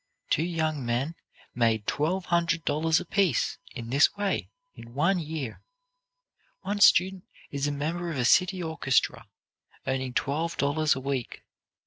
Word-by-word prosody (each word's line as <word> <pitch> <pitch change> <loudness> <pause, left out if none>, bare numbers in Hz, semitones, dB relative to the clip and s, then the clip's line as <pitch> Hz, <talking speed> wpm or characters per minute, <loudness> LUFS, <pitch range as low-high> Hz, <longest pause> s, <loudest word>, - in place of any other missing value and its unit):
Two - - +3
young 160 -4 -1
men 120 +6 -1 0.4
made 115 -3 +1
twelve 175 +9 0
hundred 170 -1 +1
dollars 160 +3 +2
apiece, 190 0 0 0.2
in 115 -1 -6
this 140 +8 +4
way, 205 -1 -1 0.2
in 115 +1 -13
one 175 +6 +2
year. 155 -6 -5 1.0
One 205 +1 -3
student 190 -1 +5 0.3
is 140 0 -1
a - - 0
member 165 +5 -3
of 160 - -4
a 125 - +1
city 185 +6 +3
orchestra, 160 -5 0 0.6
earning 130 -1 -2
twelve 160 +5 -1
dollars 150 +2 +2
a - - -4
week. 135 -2 -4
155 Hz, 140 wpm, -27 LUFS, 135-170 Hz, 1.0 s, student